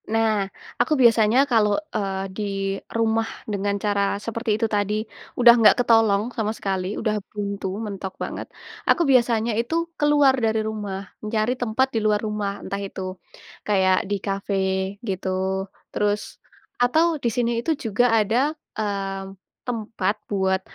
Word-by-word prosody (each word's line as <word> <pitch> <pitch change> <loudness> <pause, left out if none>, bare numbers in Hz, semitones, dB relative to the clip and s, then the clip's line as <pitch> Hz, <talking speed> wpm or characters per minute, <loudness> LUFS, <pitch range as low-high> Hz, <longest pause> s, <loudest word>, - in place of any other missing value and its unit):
Nah, 220 -3 +1 0.3
aku 245 +6 +2
biasanya 230 -1 +5
kalau, 210 -3 +3 0.2
eee, 195 -2 -1
di 215 - -3 0.5
rumah 225 0 +1 0.2
dengan 200 0 -1
cara 205 0 0 0.2
seperti 230 -1 -1
itu 225 - +1
tadi, 205 -1 0 0.5
udah 240 -1 +9
nggak 220 - +7
ketolong 225 -4 +4
sama 215 -1 -1
sekali, 190 0 -2
udah 215 -2 0
buntu, 200 -1 -4 0.2
mentok 195 -2 -5
banget, - - -5 0.4
aku - - +4
biasanya 235 -2 +3
itu 240 +8 -4 0.2
keluar 295 -2 +5
dari 220 0 +1
rumah. 210 -3 -4 0.2
Mencari 215 +2 0
tempat 245 +3 +2
di 225 - +1
luar 210 -1 +4
rumah, 210 -1 -2
entah 200 +1 -3
itu, 195 -1 -6 0.7
kayak 190 -2 +3
di 205 - +1
kafe, 195 0 -2 0.5
gitu, 190 -1 -2 0.6
terus 210 0 +1 0.6
atau, 280 +7 +4 0.2
di 235 - +2
sini 235 +1 0
itu 325 - -1
juga 225 +3 +2
ada, 220 +2 +2 0.4
eee, 195 -2 -3 0.4
tempat 215 -4 -1
buat 190 -2 +1
215 Hz, 140 wpm, -23 LUFS, 200-230 Hz, 0.7 s, udah